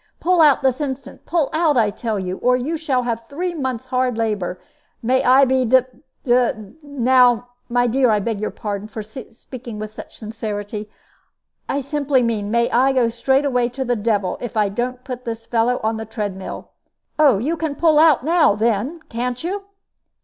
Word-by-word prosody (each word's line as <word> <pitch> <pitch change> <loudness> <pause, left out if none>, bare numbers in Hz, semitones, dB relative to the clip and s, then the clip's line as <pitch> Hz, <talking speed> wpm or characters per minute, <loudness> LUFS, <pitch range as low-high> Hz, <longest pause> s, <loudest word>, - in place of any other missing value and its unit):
"Pull 360 -1 +3
out 295 -2 +5
this 265 +2 +1
instant; 275 -1 -6
pull 330 -4 +1
out, 315 -3 +2
I 215 -3 +3
tell 220 +1 -3
you, 185 -1 -3
or 250 0 +2
you 280 +7 -2
shall 275 -6 0
have 230 -1 -2
three 350 +5 -3
months' 260 -7 -3
hard 255 -2 0
labor. 205 -5 -2 0.4
May 255 +3 +2
I 265 +2 +6
be 260 0 +2
d 255 +2 +5 0.4
d 245 -1 +3 0.3
now 250 -4 +3 0.2
my 245 0 +2
dear, 250 +1 +2
I 210 -1 +3
beg 215 0 -2
your 215 - -1
pardon 205 -1 -5
for 215 0 -7
speaking 235 +1 -10
with 215 0 -6
such - - -11
sincerity 210 -1 -5 0.8
I 280 - 0
simply 280 -2 +1
mean, 215 -3 -1
may 235 +1 +2
I 265 +3 +3
go 245 -3 +2
straightway 250 +1 +1
to 265 +2 -4
the 245 0 +1
devil, 205 -4 -1
if 240 -2 -5
I 210 -2 +3
don't 245 +4 -3
put 250 -2 -6
this 230 -1 -5
fellow 240 +2 +1
on 220 0 0
the 220 - -5
tread 210 -3 -4
mill. 190 - -8 0.5
Oh, 285 -8 +6
you 285 +11 -1
can 315 -2 -3
pull 315 -2 +4
out 305 -5 +5
now, 330 -9 +4
then, 230 +9 -1
can 245 +2 -2
you?" 390 +8 -4
245 Hz, 185 wpm, -20 LUFS, 220-270 Hz, 0.8 s, I